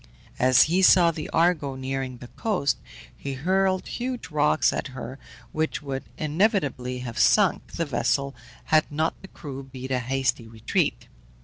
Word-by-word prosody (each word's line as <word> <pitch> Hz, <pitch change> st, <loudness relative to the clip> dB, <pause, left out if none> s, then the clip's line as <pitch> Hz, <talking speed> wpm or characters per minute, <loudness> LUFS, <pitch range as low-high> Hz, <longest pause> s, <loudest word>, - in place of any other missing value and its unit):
As 130 Hz, 0 st, +6 dB
he 175 Hz, +4 st, +1 dB
saw 180 Hz, -2 st, +6 dB
the 155 Hz, -2 st, -6 dB
Argo 160 Hz, -5 st, +1 dB
nearing 130 Hz, -1 st, -4 dB
the 120 Hz, -, -10 dB
coast, 190 Hz, -, -1 dB, 0.4 s
he 140 Hz, -, -5 dB
hurled 185 Hz, +6 st, +1 dB
huge 250 Hz, -5 st, -4 dB
rocks 150 Hz, +1 st, +3 dB
at -, -, -3 dB
her, 130 Hz, +3 st, -7 dB, 0.3 s
which 155 Hz, -1 st, -2 dB
would 135 Hz, -2 st, -4 dB
inevitably 150 Hz, -, 0 dB
have 120 Hz, 0 st, -5 dB
sunk 195 Hz, -, +3 dB
the 165 Hz, -, -1 dB
vessel 140 Hz, 0 st, 0 dB, 0.4 s
had 155 Hz, -1 st, +4 dB
not 155 Hz, +2 st, 0 dB
the 190 Hz, -, -10 dB
crew 140 Hz, -7 st, -8 dB
beat 130 Hz, -1 st, -8 dB
a 130 Hz, -, +1 dB
hasty 130 Hz, -1 st, -1 dB
retreat. 110 Hz, -, -1 dB
140 Hz, 150 wpm, -25 LUFS, 130-170 Hz, 0.4 s, As